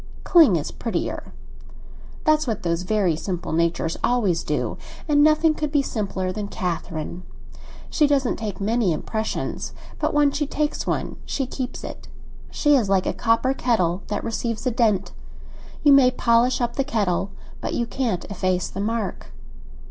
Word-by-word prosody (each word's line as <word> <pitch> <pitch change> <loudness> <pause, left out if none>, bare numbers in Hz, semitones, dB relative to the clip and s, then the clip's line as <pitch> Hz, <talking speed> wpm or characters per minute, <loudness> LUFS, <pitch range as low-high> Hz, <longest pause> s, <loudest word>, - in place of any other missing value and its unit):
"Cling 320 - +6
is 155 -3 -2
prettier. 230 - -3 0.9
That's 310 -1 +3
what 220 -3 -2
those 170 0 0
very 185 -3 +1
simple 175 +2 -4
natures 165 0 0
always 200 -9 +2
do, - - -2 0.3
and 290 -1 +4
nothing 310 +1 +4
could 300 -1 -3
be 290 -2 +3
simpler 195 -6 -2
than 205 +2 -4
Catherine. 175 -3 -4 0.7
She 300 - +4
doesn't 275 -3 +1
take 215 -3 -5
many 210 -2 +1
impressions; 220 +7 -3 0.3
but - - +1
when 295 -1 +4
she 295 0 -1
takes 300 +1 -2
one - - -2
she 270 - -2
keeps 255 0 -5
it. - - -8 0.4
She 295 -1 +3
is 230 -7 +2
like 190 -2 +3
a - - 0
copper 235 +3 +2
kettle 195 -9 +1
that 210 - -2
receives 230 0 -3
a 255 - +2
dent; 215 -5 +1 0.7
you 290 - +7
may 270 -2 +7
polish 245 0 +2
up 240 -1 -1
the 275 - +2
kettle, 200 -7 0 0.3
but - - -3
you 235 - 0
can't 230 -7 -2
efface 185 -2 -1
the 195 - -5
mark." 220 -1 -2
225 Hz, 160 wpm, -23 LUFS, 185-270 Hz, 0.9 s, you